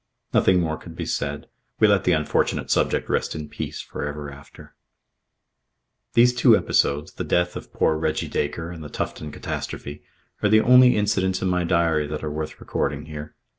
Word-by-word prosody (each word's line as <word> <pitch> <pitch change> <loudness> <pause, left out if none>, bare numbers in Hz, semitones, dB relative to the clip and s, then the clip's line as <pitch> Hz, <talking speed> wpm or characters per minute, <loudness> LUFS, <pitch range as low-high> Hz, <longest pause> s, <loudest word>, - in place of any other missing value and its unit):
Nothing 95 -1 +4
more 80 -2 -1
could - - -12
be - - -4
said. - - -3 0.3
We 110 - +6
let 100 -2 +3
the 90 - +3
unfortunate 75 -3 0
subject - - +1
rest - - -1
in 75 -1 -6
peace - - -5
for - - -7
ever 75 0 -5
after. 70 +1 -14 1.4
These 120 +1 +5
two 125 - +5
episodes, 75 +1 +1
the - - -4
death 90 0 0
of - - -8
poor 80 - +1
Reggie 80 0 -1
Dacre 80 +3 -3
and 80 -3 -8
the 75 - -8
Tufton 75 -1 -5
catastrophe, 75 0 -6 0.4
are 105 - +3
the 110 +1 +6
only 125 0 +6
incidents 95 -3 0
in 95 - +1
my 90 -1 +1
diary 85 -3 +2
that 75 +1 -5
are 75 - -3
worth 75 +1 -5
recording 70 0 -2
here. 75 -1 -8
80 Hz, 180 wpm, -23 LUFS, 75-95 Hz, 1.4 s, We